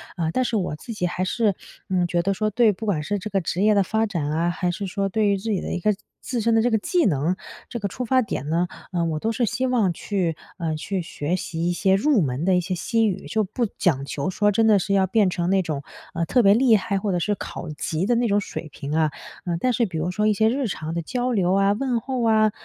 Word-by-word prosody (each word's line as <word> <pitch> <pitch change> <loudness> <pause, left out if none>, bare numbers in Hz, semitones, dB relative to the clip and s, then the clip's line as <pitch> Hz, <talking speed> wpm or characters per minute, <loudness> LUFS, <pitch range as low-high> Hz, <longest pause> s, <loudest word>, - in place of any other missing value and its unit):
呃， 165 -3 -1
但 255 - +1
是 235 - -1
我 180 -7 -1
自 230 - -7
己 195 -4 -2
还 180 +1 -2
是， 210 0 +1 0.3
嗯， 180 -2 +1
觉 175 0 +1
得 195 +3 0
说， 215 +3 0
对 225 +1 +4
不 205 +3 -6
管 175 -8 0
是 205 +6 -2
这 210 +3 -5
个 195 -2 0
职 175 +2 -2
业 215 0 +5
的 200 -1 +4
发 220 +3 0
展 165 -9 -2
啊， 165 +3 +1
还 175 0 -1
是 195 +3 -4
说 195 +1 -1
对 215 +2 +1
于 200 -1 +2
自己 200 0 -1
的 - - -5
一 - - -2
个 210 +3 +3 0.3
自 245 -3 -2
身 230 +1 +2
的 225 - +4
这 245 - +2
个 220 - +4
技 345 - +1
能， 160 +1 +1 0.3
这 235 - -4
个 200 - -1
出 250 +6 -5
发 255 +2 +3
点 170 - -4
呢， 170 +3 +1 0.2
呃， 175 -2 0
我 160 -2 -1
都 225 - -1
是 240 +1 0
希 255 +4 -1
望 230 -7 +2
去， 175 -2 -1 0.2
呃， 165 -4 -2
去 185 +5 -3
学 165 0 -3
习 170 -1 -2
一 - - +2
些 190 +2 +3
入 255 +2 +3
门 135 -1 -1
的 190 -1 +4
一 180 - +3
些 185 +1 -3
西 225 +5 +1
语。 190 - -3
就 220 -1 +1
不 225 +5 -1
讲 140 -7 +1
求 140 +3 -3
说 205 +2 +2
真 225 +2 +3
的 210 -2 +5
是 200 +2 -1
要 190 -1 +3
变 205 0 +3
成 175 -1 -1
那 195 0 +3
种， 155 -5 -3 0.3
呃， 170 0 -1
特 245 +7 +3
别 200 0 +7
厉 235 0 +5
害， 200 0 0
或 200 +1 -1
者 175 - +1
是 205 +4 0
考 175 -3 -7
级 155 +3 -2
的 240 +3 +2
那 240 0 +2
种 205 -1 +3
水 170 - -6
平 145 0 -6
啊。 160 -1 +3 0.4
呃， 170 -2 -1
但 255 - +2
是 235 0 +2
比 180 -6 -5
如 165 +3 -1
说 210 +3 +1
一 215 - +4
些 220 +2 +3
日 260 +1 0
常 160 -5 -4
的 170 - -1
交 250 +8 -2
流 190 -5 +2
啊， 195 +1 +3
问 240 +3 0
候 260 +1 -3
啊， 215 -1 +4
195 Hz, 300 characters per minute, -23 LUFS, 175-220 Hz, 0.4 s, 别